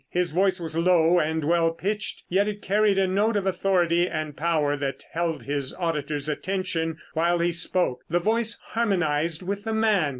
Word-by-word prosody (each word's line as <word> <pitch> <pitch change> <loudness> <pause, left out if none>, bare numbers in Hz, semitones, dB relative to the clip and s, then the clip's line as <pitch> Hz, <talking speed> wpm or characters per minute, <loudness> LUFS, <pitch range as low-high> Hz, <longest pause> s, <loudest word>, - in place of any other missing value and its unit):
His 180 -2 0
voice 185 +2 +2
was 160 -2 -5
low 170 0 +4
and 160 0 -1
well 165 +2 +3
pitched 210 +5 -3
yet 195 +3 +2
it 205 -1 -5
carried 205 0 +2
a 195 - +3
note 205 +4 +1
of 200 -2 0
authority 180 -2 +2
and 155 -2 -4
power 150 -3 +1
that 140 -1 -4
held 165 0 -2
his 140 -2 -3
auditors' 150 -4 -2
attention 165 0 -2 0.2
while 170 +2 +2
he 170 +1 +1
spoke. 170 -6 0
The 175 +2 +2
voice 225 +4 0
harmonized 170 -7 0
with 200 +2 -3
the 225 0 -2
man. 215 -8 +2
175 Hz, 175 wpm, -25 LUFS, 160-195 Hz, 0.2 s, low